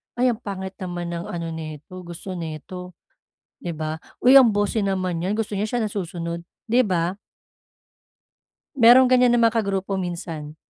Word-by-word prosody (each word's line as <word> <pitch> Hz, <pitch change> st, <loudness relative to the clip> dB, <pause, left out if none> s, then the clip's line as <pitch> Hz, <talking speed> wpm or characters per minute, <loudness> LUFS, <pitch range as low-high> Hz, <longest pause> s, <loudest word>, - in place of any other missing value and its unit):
"Ay 250 Hz, 0 st, +3 dB
ang 225 Hz, -, -5 dB
pangit 190 Hz, -4 st, -5 dB
naman 175 Hz, -2 st, -4 dB
ng 170 Hz, 0 st, -5 dB
ano 170 Hz, -1 st, -4 dB
nito 160 Hz, +2 st, -8 dB
gusto 175 Hz, +2 st, -8 dB
nito." 175 Hz, +2 st, -7 dB, 0.6 s
'Di 170 Hz, -1 st, -5 dB
ba? 155 Hz, 0 st, -4 dB, 0.2 s
"Uy 260 Hz, +2 st, +8 dB
ang 235 Hz, -5 st, +6 dB
bossy 205 Hz, +1 st, 0 dB
naman 185 Hz, -3 st, -1 dB
'yan 185 Hz, +4 st, -1 dB
gusto 215 Hz, -2 st, -2 dB
niya 205 Hz, -, 0 dB
siya 240 Hz, +1 st, -1 dB
nasusunod." 170 Hz, -4 st, -4 dB, 0.2 s
'Di 245 Hz, +3 st, +5 dB
ba? 180 Hz, 0 st, 0 dB, 1.6 s
Merong 250 Hz, +2 st, +7 dB
ganyan 250 Hz, -1 st, +5 dB
na 240 Hz, -, +3 dB
mga 230 Hz, 0 st, +3 dB
kagrupo 195 Hz, -1 st, -2 dB
minsan. 165 Hz, -4 st, -5 dB
185 Hz, 155 wpm, -23 LUFS, 170-215 Hz, 1.6 s, Uy